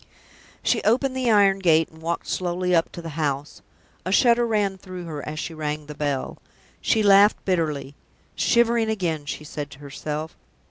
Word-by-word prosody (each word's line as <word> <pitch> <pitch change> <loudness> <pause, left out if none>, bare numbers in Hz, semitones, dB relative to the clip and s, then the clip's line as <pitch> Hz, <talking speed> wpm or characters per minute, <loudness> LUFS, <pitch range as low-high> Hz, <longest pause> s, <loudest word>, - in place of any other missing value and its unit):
She - - +2
opened 255 +4 +2
the 255 -2 0
iron 200 -3 +4
gate 165 -3 +3
and 160 0 -17
walked 170 +1 -3
slowly 180 0 -1
up 165 -1 +2
to 170 - -8
the 165 - -5
house 145 0 -2
door. - - -21 0.4
A - - -1
shudder 235 +2 +4
ran 205 -4 0
through 185 -2 -8
her 150 -3 -6
as 155 - -6
she 165 - -4
rang 150 -1 -4
the 150 - -8
bell. 145 -3 -3 0.4
She 220 -2 +2
laughed 200 +1 +5
bitterly. 155 -7 -1 0.4
"Shivering 235 -1 +2
again!" 165 -8 -2
she 150 - -5
said 150 -1 -6
to - - -13
herself. 150 +2 -6
170 Hz, 180 wpm, -24 LUFS, 150-205 Hz, 0.4 s, laughed